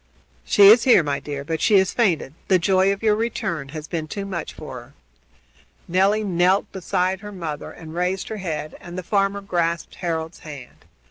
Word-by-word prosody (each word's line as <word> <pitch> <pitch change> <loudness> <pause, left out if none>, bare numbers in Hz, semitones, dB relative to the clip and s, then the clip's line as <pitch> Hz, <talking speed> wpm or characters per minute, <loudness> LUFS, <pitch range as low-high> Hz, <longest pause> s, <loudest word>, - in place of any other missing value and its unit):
"She 205 - +4
is 225 +2 +7
here, 240 -9 +6
my 140 -1 -1
dear, 140 -1 -6
but 160 +1 -3
she 205 - +5
has 190 -1 +2
fainted. 175 - +1
The 190 - +5
joy 190 +2 +3
of 200 +2 -4
your 215 -1 +4
return 190 -10 -2
has 155 0 -7
been 160 -2 -4
too 200 +5 -5
much 175 -5 -4
for 130 -5 -8
her." 120 +4 -18 0.9
Nelly 195 +4 +2
knelt 185 +1 +2
beside 185 0 -1
her 205 0 -9
mother 165 -6 -5
and 160 -1 -11
raised 180 +2 -1
her 220 - -4
head, 155 -5 -4
and 175 +1 -9
the 185 - -4
farmer 200 +2 0
grasped 170 -3 -1
Harold's 165 -2 -4
hand. 145 -5 -11
180 Hz, 190 wpm, -22 LUFS, 160-195 Hz, 0.9 s, is